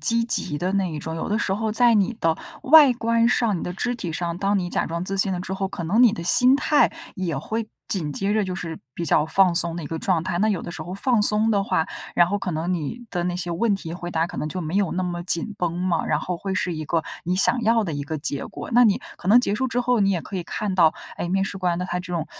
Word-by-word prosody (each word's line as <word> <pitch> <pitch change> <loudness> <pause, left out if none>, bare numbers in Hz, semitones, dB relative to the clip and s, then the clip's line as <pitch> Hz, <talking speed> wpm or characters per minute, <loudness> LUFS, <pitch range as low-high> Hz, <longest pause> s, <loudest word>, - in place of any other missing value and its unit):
积 230 0 +3
极 150 -10 0
的 180 +4 -2
那 195 -3 0
一 155 - -5
种， 160 +2 -5
有 165 - -4
的 210 - 0
时 190 - -1
候 215 +2 -1
在 235 +2 +4
你 210 +2 +2
的 165 -1 +3 0.3
外 295 0 +8
观 230 0 +2
上、 230 -5 +1
你 - - -6
的 - - -4
肢 245 +5 -2
体 180 -8 -5
上， 170 +1 -3
当 200 +1 +1
你 175 -2 -3
假 - - -1
装 170 +2 -3
自 195 +1 -3
信 195 0 +1
了 180 - -2
之 185 +1 -5
后， 195 0 -2
可 170 - -6
能 205 +9 +3
你 230 -4 +5
的 170 - -6
心 250 +8 +6
态 295 +1 +3 0.2
也 175 -7 -3
会 220 +9 -4 0.2
紧 160 -7 -2
接 195 +6 -1
着 215 0 +2
就 185 -1 -4
是 165 -3 -6 0.2
比 170 - -4
较 150 0 +2
放 185 +1 +3
松 170 -1 -1
的 170 - -5
一 145 - -6
个 165 +1 -4
状 175 -3 0
态。 175 -2 -2
那 215 +3 +2
有 200 - -1
的 - - -6
时 175 - -6
候 180 - -7
放 235 +3 +1
松 215 +1 +2
的 200 -2 +2
话， 160 -3 0 0.3
然 175 - +5
后 200 +3 -1
可 190 - -3
能 170 +2 -2
你 180 - -4
的 175 -2 -2
那 180 0 -1
些 175 -1 -4
问 200 +5 +1
题 165 -4 -6
回 175 0 -6
答 165 0 0
可 - - -8
能 150 - -2
就 185 +3 -4
没 160 +3 -4
有 200 -4 +1
那 185 - -1
么 175 -1 -4
紧 180 +4 -1
绷 175 -1 -2
嘛， 180 -2 0
然 - - +1
后 180 -1 -4
会 195 +1 -3
是 180 -1 -1
一 155 - -5
个 165 -1 0 0.2
你 180 +2 0
想 240 +5 +5
要 225 0 +3
的 165 - -4
一 145 - -3
个 155 +1 -4
结 140 -1 -1
果。 - - -8
那 245 +1 +6
你 205 -4 +3 0.2
可 180 - -5
能 225 +4 +7
结 210 -5 +1
束 260 +3 -1
之 245 +2 -1
后， 245 -2 +1
你 195 - +3
也 180 - 0
可 - - -10
以 175 - -3
看 195 +3 -3
到， 165 -4 +4 0.2
哎， 175 - -3
面 195 +2 +1
试 195 - -5
官 175 -2 0
的 180 - -2
他 180 0 -3
这 180 0 -10
种 160 -3 -2
185 Hz, 320 characters per minute, -23 LUFS, 170-215 Hz, 0.3 s, 外